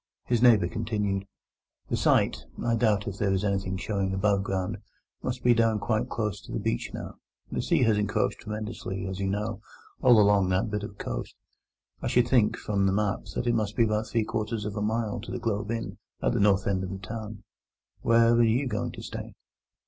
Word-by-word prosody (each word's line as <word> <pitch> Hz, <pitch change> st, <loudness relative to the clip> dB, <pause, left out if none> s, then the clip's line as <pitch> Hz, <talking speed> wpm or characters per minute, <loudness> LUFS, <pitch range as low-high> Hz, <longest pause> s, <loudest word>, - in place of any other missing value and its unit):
His 120 Hz, -2 st, +1 dB
neighbour 115 Hz, -8 st, +6 dB
continued: 105 Hz, -2 st, -2 dB, 0.6 s
"The -, -, +1 dB
site—I 120 Hz, -, +1 dB
doubt 110 Hz, -3 st, +2 dB
if 100 Hz, -1 st, -5 dB
there 100 Hz, -2 st, +1 dB
is 95 Hz, +1 st, +1 dB
anything 95 Hz, -2 st, -1 dB
showing 95 Hz, -1 st, -1 dB
above 100 Hz, 0 st, +2 dB
ground—must 100 Hz, +6 st, -5 dB
be 120 Hz, -, +6 dB
down 115 Hz, -1 st, +3 dB
quite 110 Hz, +1 st, -1 dB
close 105 Hz, -4 st, -2 dB
to -, -, -12 dB
the -, -, -2 dB
beach -, -, -1 dB
now. -, -, -7 dB, 0.3 s
The -, -, -1 dB
sea -, -, +2 dB
has 110 Hz, -3 st, +3 dB
encroached 105 Hz, 0 st, 0 dB
tremendously, 105 Hz, -3 st, -5 dB
as 95 Hz, 0 st, -4 dB
you 100 Hz, -, -1 dB
know, 105 Hz, +2 st, -2 dB, 0.4 s
all 120 Hz, -3 st, +7 dB
along 100 Hz, -2 st, +4 dB
that 95 Hz, +4 st, +1 dB
bit 105 Hz, -1 st, -1 dB
of 105 Hz, -1 st, -8 dB
coast. -, -, -5 dB, 0.7 s
I -, -, -2 dB
should 120 Hz, -1 st, +3 dB
think, 120 Hz, -4 st, +3 dB
from 100 Hz, -2 st, 0 dB
the -, -, +3 dB
map, 105 Hz, +1 st, 0 dB
that -, -, -1 dB
it 120 Hz, -, +2 dB
must 105 Hz, -2 st, -1 dB
be 115 Hz, -, +4 dB
about 110 Hz, 0 st, 0 dB
three 115 Hz, -2 st, +1 dB
quarters 110 Hz, 0 st, -3 dB
of 105 Hz, -2 st, -4 dB
a 105 Hz, -, -2 dB
mile 110 Hz, 0 st, -1 dB
from -, -, -5 dB
the -, -, -3 dB
Globe 105 Hz, -3 st, -2 dB
Inn, 115 Hz, 0 st, -4 dB, 0.2 s
at -, -, +1 dB
the -, -, +1 dB
north 100 Hz, -1 st, +3 dB
end 95 Hz, -1 st, 0 dB
of 95 Hz, -, -4 dB
the 95 Hz, -, -5 dB
town. 105 Hz, +1 st, -7 dB, 0.6 s
Where 115 Hz, 0 st, +5 dB
are 120 Hz, 0 st, +5 dB
you 115 Hz, +5 st, +2 dB
going 105 Hz, -4 st, -2 dB
to -, -, -9 dB
stay?" -, -, -7 dB
105 Hz, 205 wpm, -27 LUFS, 100-115 Hz, 0.7 s, all